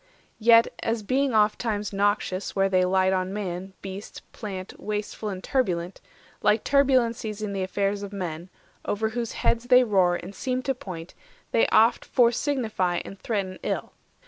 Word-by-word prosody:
Yet, 230 +1 +6
as 225 -1 -1
being 260 +2 +1
ofttimes 210 -1 +1
noxious 200 -1 0
where 195 0 +2
they 185 -1 +3
light 190 0 +3
460 - - +2
On 185 +1 -5
man, 190 -1 -4
beast, 195 +1 -8
plant, 190 -4 -7
wasteful 210 0 -4
and 190 -2 -6
turbulent, 185 -9 -1 0.4
Like 210 +1 +3
turbulencies 235 -6 +2
in 205 -1 -3
the 195 - -2
affairs 200 +2 -1
of 200 -1 -6
men, 175 -3 -5 0.3
Over 220 +2 -1
whose 230 0 -3
heads 235 +1 0
they 250 0 +6
roar, 190 -6 +3
and 175 +3 -7
seem 255 +4 -2
to 270 - 0
point, 180 -8 -8 0.4
They 230 - +3
oft 225 +2 +4
fore 240 -2 +3
signify 220 - -1
and 195 - -9
threaten 195 -5 -3
ill. - - -3
205 Hz, 165 wpm, -26 LUFS, 190-230 Hz, 0.4 s, Yet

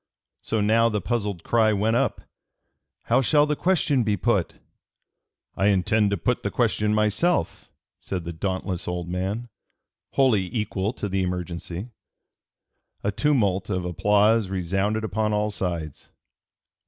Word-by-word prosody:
So 110 - -1
now 115 +2 +4
the 105 -2 -1
puzzled 105 -4 -2
cry 110 -2 +3
went 110 +3 +1
up: - - 0 0.8
"How - - +3
shall 145 +3 +4
the 150 0 0
question 155 -6 +2
be 105 -2 0
put?" 100 -3 0 1.0
"I 95 - +2
intend 105 +2 +2
to 100 - 0
put - - 0
the - - -2
question 105 0 +1
myself," 105 - 0 0.3
said 90 -3 -4
the 85 +1 -5
dauntless 95 +1 -3
old 90 -1 -3
man, 95 +7 -3 0.6
wholly 110 -9 +3
equal 105 -2 -1
to 105 - -4
the 95 0 -1
emergency. 90 +2 -4 1.1
A 100 - +1
tumult 105 -7 +1
of 90 -3 -1
applause 105 +4 +2
resounded 95 +4 -1
upon 110 0 -1
all 105 0 0
sides. 85 -6 -4
105 Hz, 135 wpm, -24 LUFS, 95-110 Hz, 1.1 s, now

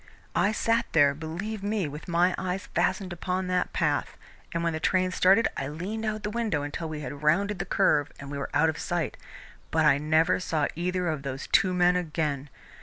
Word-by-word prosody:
I 205 - +3
sat 230 +1 +1
there, 145 -3 +5
believe 170 +8 -5
me, 205 -3 -1
with 150 +5 -8
my 175 +1 +3
eyes 185 +1 -3
fastened 185 -3 0
upon 185 +2 -2
that 180 0 0
path, - - 0 0.3
and 170 0 -2
when 170 -1 0
the 160 - -2
train 185 +2 +1
started 195 +5 +4
I 135 - -3
leaned 190 +10 -4
out 215 0 0
of 215 - -9
the 210 - -2
window 215 -10 -1
until 155 +3 -4
we 155 -1 -5
had 140 +1 -6
rounded 190 +6 +2
the - - -2
curve 145 -7 +2
and 140 0 -8
we 140 - -4
were 140 - -4
out 160 - +3
of 160 -1 -2
sight, 175 -4 -2 0.5
but 160 -1 +2
I 140 -2 +5
never 160 +4 +3
saw 160 -4 0
either 180 +2 -1
of 155 -4 -1
those 135 0 -5
two 195 -4 +4
men 180 0 +4
again. 150 -5 -2
170 Hz, 210 wpm, -27 LUFS, 150-190 Hz, 0.5 s, there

